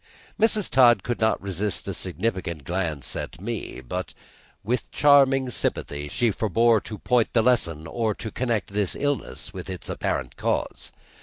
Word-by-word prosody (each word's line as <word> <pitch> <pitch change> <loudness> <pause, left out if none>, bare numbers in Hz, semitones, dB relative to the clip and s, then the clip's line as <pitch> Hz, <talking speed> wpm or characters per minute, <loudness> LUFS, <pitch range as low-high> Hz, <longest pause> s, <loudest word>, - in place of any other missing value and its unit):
Mrs. 215 -2 +3
Todd 120 -2 +5
could 120 - -2
not 110 -1 +2
resist 100 +1 -3
a - - -2
significant 90 -7 -3
glance 80 -6 -3
at - - -5
me, - - -5
but, 90 +9 -5 0.5
with 120 +5 -1
charming 135 -3 +5
sympathy, 75 -9 -2
she 120 - +1
forbore 110 +2 +3
to 105 - -6
point 125 0 +1
the 115 - +4
lesson 85 -11 +2
or 110 +3 -1
to 110 - -6
connect 115 -5 -1
this 100 -3 +1
illness 145 -1 -2
with - - -7
its - - -6
apparent 60 -2 -2
cause. - - -2
110 Hz, 155 wpm, -25 LUFS, 90-125 Hz, 0.5 s, Todd